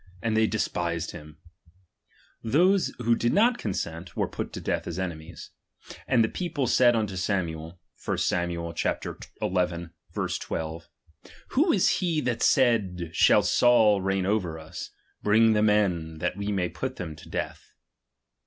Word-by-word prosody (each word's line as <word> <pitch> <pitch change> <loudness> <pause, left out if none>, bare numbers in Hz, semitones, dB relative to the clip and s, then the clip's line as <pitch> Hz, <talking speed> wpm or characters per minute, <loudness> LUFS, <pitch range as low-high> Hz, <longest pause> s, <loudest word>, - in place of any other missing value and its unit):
And 115 -1 0
they 110 0 +4
de 110 - -2
spised 85 -4 -2
hint; 75 0 -11 1.1
those 180 - +3
who 120 -1 +2
did 120 +1 0
not 235 +4 +3
consent, 85 -3 -4
were - - +1
put - - -5
to - - -5
death - - -2
as 85 - -4
enemies. 85 -2 -6 0.6
And 120 -3 +4
the - - +2
people 165 -1 -2
said 120 0 +4
unto 105 -4 -1
Samuel 90 -3 -2 0.2
(1 - - -1
Sam. 85 0 0
xi. 85 -1 -2 0.5
12): 85 -2 -3 0.6
Who 320 +6 +3
is 190 - +3
he 170 -4 0
that 120 -4 -2
said, 95 -9 +2
shall - - +5
Saul 110 -5 +4
reign 95 0 0
over 95 -5 0
us? 80 0 -8 0.3
Bring 110 +2 +4
the 105 - +2
men, 95 -7 +1
that 90 +3 -2
we 100 +1 -3
may 95 -3 0
put - - -5
them 80 -3 -6
to - - -13
death. - - -5
95 Hz, 150 wpm, -27 LUFS, 85-115 Hz, 1.1 s, shall